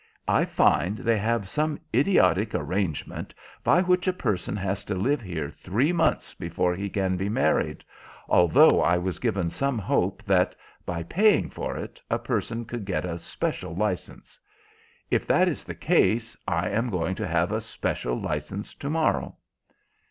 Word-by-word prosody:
I - - +3
find 95 +5 +2
they 115 -1 +1
have 110 -1 0
some 150 +6 -1
idiotic 110 - +3
arrangement 90 0 -3 0.3
by 180 - +4
which 180 0 +2
a 185 - +3
person 100 - -2
has 100 0 -2
to 100 - -2
live 135 +10 +1
here 80 -8 -4
three 115 - 0
months 170 - +1
before 85 +1 -1
he 100 +3 -4
can 95 -2 0
be 95 +2 -2
married, 105 - +1 0.4
although 85 -2 +6
I 85 - +3
was 90 +1 -3
given 100 -8 0
some 135 +5 0
hope 95 0 0
that, 95 -4 +2 0.3
by 85 -1 -2
paying 205 - +3
for - - -4
it, - - -8
a - - +1
person 115 +1 -2
could 120 -1 -5
get 95 -2 -2
a 85 -1 -4
special 85 0 -4
licence. 100 -1 -3 0.7
If - - +1
that - - +4
is - - -2
the - - -7
case, 115 +1 +2
I 85 +1 0
am 115 +3 0
going 90 -3 -1
to - - -3
have - - +1
a - - -1
special - - -3
licence 75 +7 -4
to 140 - -6
morrow." 160 +1 0
100 Hz, 165 wpm, -26 LUFS, 90-115 Hz, 0.7 s, although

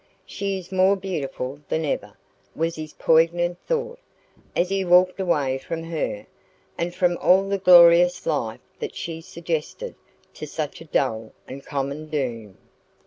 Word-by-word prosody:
"She 195 -1 -3
is 185 0 -10
more 190 +1 +4
beautiful 145 -8 -4
than 160 0 0
ever," 145 - -3 0.4
was 165 +1 -1
his 155 -1 -7
poignant 175 +2 +2
thought, 485 0 -2 0.6
as 175 +1 +1
he 195 0 0
walked 180 +1 +4
away 145 -8 0
from 165 +4 -5
her, 160 -10 -3 0.5
and 175 +1 -3
from 180 -2 +2
all 190 +2 +4
the 200 0 -1
glorious 175 -1 +7
life 120 -8 -2 0.2
that - - -5
she 165 -1 -5
suggested 170 - -4 0.4
to - - -8
such 155 0 -5
a - - -10
dull 115 -7 -1
and 135 +1 -9
common 140 +2 -4
doom. 120 -9 -4
165 Hz, 145 wpm, -23 LUFS, 145-185 Hz, 0.6 s, glorious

